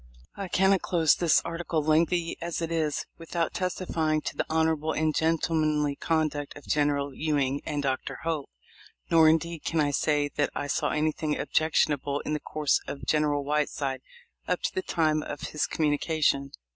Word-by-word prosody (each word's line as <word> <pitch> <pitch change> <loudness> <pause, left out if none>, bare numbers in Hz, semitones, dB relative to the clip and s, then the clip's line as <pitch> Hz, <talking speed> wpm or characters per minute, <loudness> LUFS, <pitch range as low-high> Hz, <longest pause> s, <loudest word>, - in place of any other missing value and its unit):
I 195 - -5
cannot 190 +1 +3
close 165 -4 +3
this 170 -3 +3
article, 165 -2 -2
lengthly 165 +2 +2
as 170 0 -3
it 165 -1 -3
is, 155 -3 -1
with 165 +1 -10
out 165 -1 0
testifying 165 -4 -1
to - - -5
the - - -2
honorable 160 -1 +1
and 155 0 +1
gentlemanly 155 -3 +1
conduct 150 -3 -1
of 145 - -13
General 145 -1 +1
Ewing 145 -2 0
and 145 -2 -2
Dr. 130 -1 -2
Hope, 160 -4 -2 0.6
nor 160 -1 +7
indeed 165 0 0
can 165 - -1
I 145 -1 +2
say 145 +1 +1
that 145 - +2
I 145 - -2
saw 145 - 0
anything 155 0 0
objectionable 145 -3 +1
in 150 - -3
the 150 - -1
course 150 -1 0
of 140 - -6
General 150 -2 +1
Whiteside 145 -2 -1 0.5
up - - -1
to - - -1
the 375 - -1
time 155 - +1
of 145 -1 -6
his 150 - -2
communication. 145 -2 +1
155 Hz, 170 wpm, -27 LUFS, 145-165 Hz, 0.6 s, nor